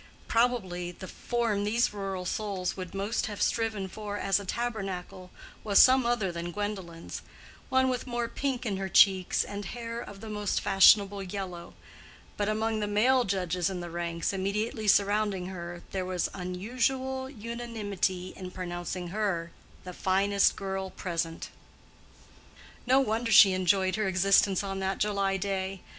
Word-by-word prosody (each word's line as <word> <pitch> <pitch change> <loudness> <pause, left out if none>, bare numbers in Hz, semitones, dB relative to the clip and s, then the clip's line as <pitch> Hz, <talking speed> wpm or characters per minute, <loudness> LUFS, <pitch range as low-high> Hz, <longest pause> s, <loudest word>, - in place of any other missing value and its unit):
Probably 190 -8 0
the 185 +1 -10
form 230 -3 -1
these 225 +2 +1
rural 195 -2 -4
souls 190 -2 -2
would 185 -1 -7
most 200 +4 -1
have 205 -2 -6
striven 220 -4 0
for 205 +1 -6
as 195 -1 +1
a 200 - -8
tabernacle, 195 -5 -4 0.3
was 205 -2 +2
some 255 -1 +7
other 225 -6 +1
than 170 0 -5
Gwendolen's—one 205 +6 -4
with 255 0 -2
more 240 -1 -1
pink 265 0 -3
in 200 -4 -1
her 195 0 -3
cheeks 190 -1 +5
and 205 0 -6
hair 230 +3 -5
of 200 -4 -10
the 220 - -9
most 210 -2 -1
fashionable 200 +1 +5
yellow; 185 -2 -6 0.6
but 205 0 -1
among 220 +1 0
the 210 - -1
male 245 +5 +3
judges 180 -2 0
in 190 -2 -4
the 175 -1 -6
ranks 170 +1 -2
immediately 210 +3 -2
surrounding 205 -1 +2
her 175 -2 -7
there 190 -1 -2
was 180 -1 -1
unusual 255 +8 -2
unanimity 210 -6 -3
in 185 -1 -7
pronouncing 175 -1 -5
her 180 -4 -1 0.3
the 180 - -8
finest 195 +2 +2
girl 190 -1 -4
present. 170 -3 -4 1.4
No 260 +2 +5
wonder 230 -2 0
she 195 -1 +8
enjoyed 185 +1 +2
her 215 -2 0
existence 195 +1 +3
on 195 -1 -4
that 190 0 -1
July 200 -2 0
day. 190 -1 -3
195 Hz, 150 wpm, -29 LUFS, 185-220 Hz, 1.4 s, she